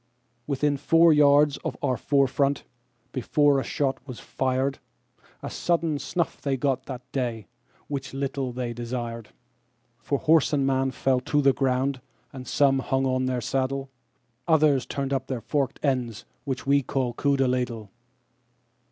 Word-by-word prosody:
Within 145 +1 +1
four 165 +3 +5
yards 145 -1 +5
of - - -5
our 130 - +1
fore 140 +1 +2
front, 140 +1 0 0.5
before 140 +2 +2
a - - -2
shot 135 -2 -1
was 125 -3 -7
fired,A 130 +1 -4
sudden 165 -4 0
snuff 170 +3 -2
they 135 -2 -1
got 135 0 -1
that 125 -2 -6
day, 120 -5 -2 0.4
which 140 -2 -4
little 135 -1 -3
they 120 -1 -4
desired; 120 -1 -5 0.7
For 140 +5 -1
horse 155 +1 +3
and 140 -2 +2
man 135 0 +1
fell 130 0 +1
to 145 +3 0
the 140 -2 +4
ground, 130 0 0 0.3
and 130 -2 -8
some 135 0 +3
hung 135 0 0
on 130 0 +1
their 125 -1 -1
saddle:Others 135 +2 -1
turned 140 0 -2
up 130 -1 -2
their 130 -3 -3
forked 135 +3 -1
ends, 125 -7 -1 0.2
which 135 -3 -3
we 140 +1 +4
call 130 -2 -2
coup 140 +2 +1
de 135 -1 +2
ladle. 120 -5 -2
135 Hz, 150 wpm, -26 LUFS, 125-140 Hz, 0.7 s, four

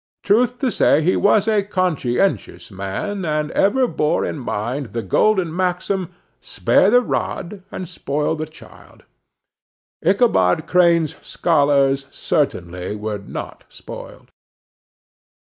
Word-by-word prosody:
Truth 245 +4 +2
to 260 -3 +1
say, 155 - +3
he 180 - +2
was 205 +1 +3
a 215 -2 +3
conscientious 185 - -1
man, 100 - -4
and 150 -2 -1
ever 250 +6 +2
bore 150 -9 0
in - - -4
mind 125 +3 -3
the 115 -1 -3
golden 175 - +1
maxim, 185 0 -1 0.3
"Spare - - +2
the 245 - +5
rod 195 -4 -3
and 185 - -6
spoil 150 -3 -2
the 155 0 -4
child." 155 - -16 1.0
Ichabod 165 - +3
Crane's 170 -3 +3
scholars 140 -4 +2
certainly 90 +3 -2
were 105 0 -4
not 100 - -8
spoiled. - - -11
165 Hz, 115 wpm, -20 LUFS, 135-195 Hz, 1.0 s, the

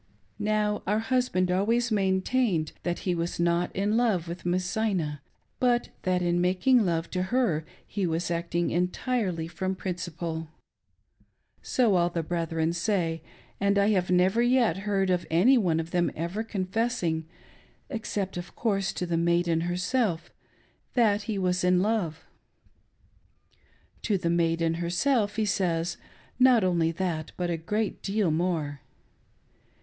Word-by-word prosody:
Now, 210 0 0
our 210 +2 +2
husband 225 -6 +1
always 230 +6 +1
maintained 190 -3 +1
that 175 0 -2
he 180 - +1
was 170 0 -3
not 170 +1 +1
in. 205 +3 +1
love 210 -9 +1
with 170 +1 -6
Miss 180 +1 +1
Zina, 180 - -1 0.4
but 245 -1 +2
that 180 -1 0
in 175 0 +1
making 190 +7 +3
love 170 -3 -1
to 180 - -1
her 185 -6 +1 0.2
he 200 -3 -2
was 165 +1 -1
acting 170 0 -1
entirely 180 -1 -1
from 185 +3 -3
principle. 170 -3 -4 1.1
So 240 -5 +2
all 175 0 +2
the 170 -1 -2
brethren 165 0 -1
say; 170 -3 -1 0.4
and 200 0 +2
I 200 +1 +4
have 185 -4 +1
never 185 +5 +3
yet 240 -7 +3
heard 195 -1 0
of 180 -1 0
any 185 +12 +5
one 175 -9 +2
of 165 +1 -5
them 175 -1 +2
ever 170 +7 -3
confessing 190 -5 -1 0.3
— - - -27 0.3
except, 210 -7 -3
of 175 0 -7
course, 195 -4 0
to 180 - -3
the 170 -1 -1
maiden 170 0 +2
herself 180 +1 -1 0.3
— - - -39
that 215 -4 +3
he 210 - -1
was 180 -1 0
in 180 0 +4
love. 185 -6 -1 1.8
To 205 -3 +1
the 170 -2 -1
maiden 165 -1 +1
herself 205 +5 +1
he 220 -1 +1
says, 175 -4 0 0.4
not 250 -4 +6
only 170 -3 +2
that, 165 -3 -3
but 175 -1 -1
a - - 0
great 210 +6 -2
deal 200 -3 0
more. 155 -4 -1
180 Hz, 145 wpm, -27 LUFS, 170-210 Hz, 1.8 s, not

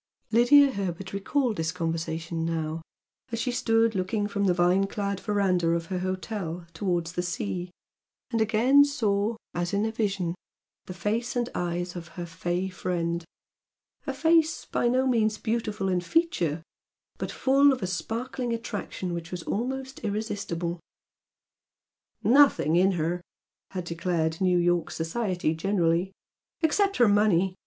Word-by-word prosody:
Lydia 270 +5 +6
Herbert 190 -3 -4
recalled 225 +3 0
this 160 0 -1
conversation 165 -1 -3
now, 165 -1 -2 0.5
as 230 - -2
she 250 +2 0
stood 225 -1 +2
looking 200 +2 -1
from 200 -1 -1
the 185 - +4
vine 180 +3 +3
clad 200 -1 -3
verandah 190 -5 +1
of 165 0 -2
her 180 - 0
hotel 185 -2 -4
towards 170 -1 -1
the 175 - -1
sea, 180 +1 -3 0.6
and 230 -2 +1
again 235 +6 +5
saw, 225 -6 0 0.2
as 175 +2 -1
in 205 +2 +1
a 220 - -1
vision, 200 -6 -1 0.5
the 185 - -7
face 220 +8 -1
and 245 0 0
eyes 175 0 -2
of 170 -2 -7
her 175 - -3
"fey" 175 +2 -2
friend, 170 -2 -2 0.8
a - - -1
face 325 0 +3
by - - 0
no 255 +2 +2
means 220 -4 +2
beautiful 220 -4 -2
in 180 -1 +1
feature, 175 - 0 0.6
but - - -3
full 275 +2 +4
of 255 -6 -2
a - - +1
sparkling 235 +7 -3
attraction 205 -5 -4
which 170 -1 -5
was 180 -2 -5
almost 265 +4 -3
irresistible. 200 -5 -3 1.4
"Nothing 250 - +5
in 190 +2 +4
her!" 175 +1 -1 0.5
had 185 -2 -4
declared 170 -1 -1
New 180 -1 +3
York 175 -1 +2
society 175 -1 -1
generally 175 +1 +1 0.5
"Except 395 +5 +2
her 240 - +6
money! 205 -3 +3
190 Hz, 145 wpm, -27 LUFS, 175-230 Hz, 1.4 s, Lydia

